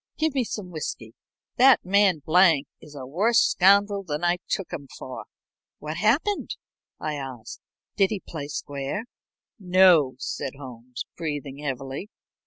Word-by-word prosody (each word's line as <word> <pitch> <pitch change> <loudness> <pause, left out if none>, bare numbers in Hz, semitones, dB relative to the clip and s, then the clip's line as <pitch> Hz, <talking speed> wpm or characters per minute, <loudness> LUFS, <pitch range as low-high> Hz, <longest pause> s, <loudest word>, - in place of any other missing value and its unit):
"Give 315 -2 0
me 265 -3 +1
some 210 -5 -6
whiskey. 125 -8 -6 0.4
That 260 -3 +6
man 190 -5 +3
Blank 165 -4 +5 0.2
is 150 -2 -14
a 135 -2 -7
worse 210 - +2
scoundrel 200 +1 +4
than 150 -2 -4
I 175 0 +2
took 195 - -3
him 140 -2 -6
for." 130 - -8 0.5
"What's 155 +2 -6
happened?" 280 - +1 0.4
I 155 - -3
asked. 130 -5 -7 0.4
"Didn't 195 -2 +4
he 210 -3 -4
play 145 -4 -6
square?" 145 +6 -4 0.6
"No," 180 -8 +5
said 130 +1 -4
Holmes, 125 -2 -8
breathing 145 -3 -5
heavily. 135 +5 -5
160 Hz, 140 wpm, -25 LUFS, 140-200 Hz, 0.6 s, That